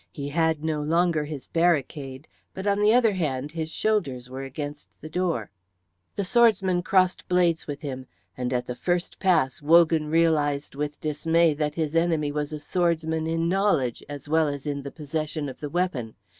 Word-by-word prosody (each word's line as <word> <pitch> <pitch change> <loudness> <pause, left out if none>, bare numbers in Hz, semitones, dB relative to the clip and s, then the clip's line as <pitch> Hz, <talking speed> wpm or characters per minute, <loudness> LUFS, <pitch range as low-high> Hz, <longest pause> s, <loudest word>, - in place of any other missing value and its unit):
He 140 -1 -5
had 160 0 +1
no 155 -2 -1
longer 165 0 +1
his 145 -3 -7
barricade, 145 -4 0 0.3
but 190 - -5
on 200 0 +2
the 210 +1 +5
other 230 -3 +4
hand 145 -6 -2
his 160 -1 -4
shoulders 140 - -1
were 130 +1 -5
against 145 +2 -6
the 155 - -9
door. 170 - -1 0.6
The 200 - -1
swordsman 195 -5 +3
crossed 185 0 +2
blades 175 -2 +2
with 145 0 -5
him, 130 -4 -6 0.3
and 125 0 -3
at 125 -1 -1
the 125 - -4
first 175 +7 -2
pass 160 -9 +2
Wogan 160 0 +4
realised 150 -3 +1
with 145 +1 -4
dismay 160 +2 +2
that 150 0 -2
his 160 -1 -2
enemy 165 -3 +2
was 150 0 -3
a 150 - -5
swordsman 160 -1 0
in 165 +1 0
knowledge 180 - +1
as 145 -1 -8
well 160 +1 +3
as 145 -1 -4
in 145 -1 -2
the 140 0 -7
possession 155 0 -4
of 130 - -8
the 145 - -5
weapon. 150 -10 -2
155 Hz, 180 wpm, -25 LUFS, 145-170 Hz, 0.6 s, the